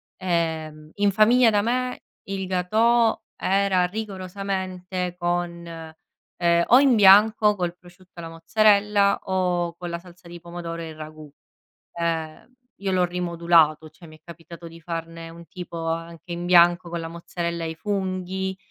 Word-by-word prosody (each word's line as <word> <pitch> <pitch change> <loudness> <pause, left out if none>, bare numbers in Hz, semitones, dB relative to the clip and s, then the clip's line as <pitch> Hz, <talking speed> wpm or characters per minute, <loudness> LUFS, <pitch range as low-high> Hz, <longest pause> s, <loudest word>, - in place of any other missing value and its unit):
ehm, 160 -4 -3
in 205 0 +1
famiglia 230 +4 +5
da 205 -1 +2
me 250 +3 -2 0.3
il 195 -1 -3
gâteau 220 +6 +2 0.2
era 195 -1 +1
rigorosamente 185 -2 -5
con, 175 -1 -3
ehm, 165 +1 -3
o 250 - +7
in 270 -3 +4
bianco 210 +1 +6
col 175 -1 -2
prosciutto 180 +1 -20
e - - -6
la 165 - -7
mozzarella 200 +4 +2
o 180 -2 -1
con 175 0 -7
la 170 0 -4
salsa 175 0 -16
di 175 0 -10
pomodoro 170 -1 -7
e 165 - -6
il 155 - -10
ragù, 155 -1 -10 0.6
ehm, 165 +5 -4 0.3
io 195 - -1
l'ho 185 - +2
rimodulato, 170 -3 +1
cioè 155 +2 -16
mi 155 - -14
è - - -41
capitato 170 0 -12
di 165 - -13
farne 165 0 -6
un 170 +1 -13
tipo 170 -2 -7
anche 165 +1 -5
in 175 +1 -4
bianco 175 0 +4
con 170 0 -4
la 165 - -6
mozzarella 170 0 -5
e 160 - -3
i - - -8
funghi 190 0 -3
175 Hz, 155 wpm, -23 LUFS, 170-195 Hz, 0.6 s, o